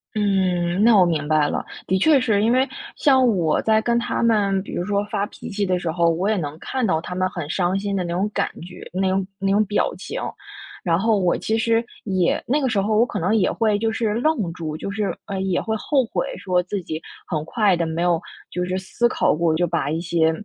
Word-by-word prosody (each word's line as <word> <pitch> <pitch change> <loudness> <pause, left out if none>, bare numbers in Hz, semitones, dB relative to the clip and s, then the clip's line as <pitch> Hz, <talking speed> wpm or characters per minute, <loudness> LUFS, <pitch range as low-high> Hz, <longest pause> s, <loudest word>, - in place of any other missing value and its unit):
嗯， 190 -3 +1
那 230 -1 +6
我 185 - +6
明 155 -3 -1
白 155 -1 +3
了。 - - -2 0.2
的 190 - +1
确 300 +4 +5
是， 220 -5 +2
因 230 - +3
为 260 +2 +3 0.3
像 265 -3 +4
我 160 -3 +1
在 220 0 +3
跟 235 0 +1
他 235 - -1
们， 200 -4 +2
比 - - -9
如 - - -2
说 200 0 0
发 200 -2 0
脾 - - -10
气 205 0 -2
的 185 -1 +1
时 175 -2 -2
候， 170 0 +2
我 170 +4 0
也 220 - +2
能 150 -2 -4
看 260 +4 -2
到 160 -6 +1
他 180 - -6
们 185 +1 0
很 175 -5 -5
伤 180 +1 0
心 200 0 -2
的 185 - 0
那 170 -1 -3
种 190 +4 0
感 - - 0
觉， 180 +1 -10
那 190 +1 +1
种 190 0 0
那 195 0 0
种 205 +2 +4
表 205 +1 0
情。 - - -5 0.6
然 165 -2 +2
后 215 +2 +2
我 180 -2 +2
其 220 - -1
实 230 +1 +1 0.2
也 185 -4 +1
那 285 +5 +2
个 265 - +1
时 220 -4 +1
候 215 +2 0
我 235 - +5
可 210 - -4
能 185 +6 +1
也 205 -4 +2
会 215 -3 +1
就 225 +1 0
是 220 -1 -1
愣 235 - 0
住， 160 -3 -5
就 195 - -5
是， 200 0 -2
呃， 195 -2 -4
也 190 -2 0
会 220 0 -2
后 270 +5 +1
悔 - - -2
说 180 -1 0
自 190 +2 -4
己 160 -1 -5 0.3
很 155 -3 -2
快 205 +1 +2
地， 170 -1 -1
没 160 +1 -3
有 175 -1 +2 0.3
就 180 - -2
是 185 +1 -2
思 235 +5 0
考 - - +2
过， 165 0 +1
就 175 +1 +1
把 140 - -1
一 160 +2 -1
些， 165 -1 +2
195 Hz, 265 characters per minute, -22 LUFS, 175-220 Hz, 0.6 s, 那